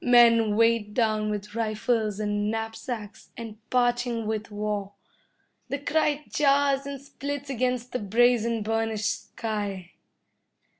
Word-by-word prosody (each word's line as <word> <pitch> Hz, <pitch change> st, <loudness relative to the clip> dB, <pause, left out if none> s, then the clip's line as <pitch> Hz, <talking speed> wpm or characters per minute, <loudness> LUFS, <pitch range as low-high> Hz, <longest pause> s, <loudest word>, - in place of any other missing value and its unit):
Men 230 Hz, -3 st, +6 dB
weighed 230 Hz, -2 st, +2 dB
down 215 Hz, -3 st, +1 dB
with 210 Hz, 0 st, -4 dB
rifles 215 Hz, -1 st, 0 dB
and 205 Hz, 0 st, 0 dB
knapsacks, 225 Hz, -1 st, -5 dB
and 225 Hz, -2 st, -7 dB
parching 245 Hz, -2 st, +1 dB
with 215 Hz, 0 st, -2 dB
war. 205 Hz, -1 st, -3 dB, 0.8 s
The 280 Hz, -, -1 dB
cry 295 Hz, +1 st, 0 dB
jars 280 Hz, -1 st, +2 dB
and 280 Hz, -1 st, -5 dB
splits 280 Hz, 0 st, -5 dB
against 250 Hz, -1 st, -1 dB
the 250 Hz, -, -1 dB
brazen, 230 Hz, +1 st, +2 dB
burnished 225 Hz, -1 st, -1 dB
sky. 205 Hz, -5 st, -4 dB
225 Hz, 115 wpm, -27 LUFS, 210-250 Hz, 0.8 s, Men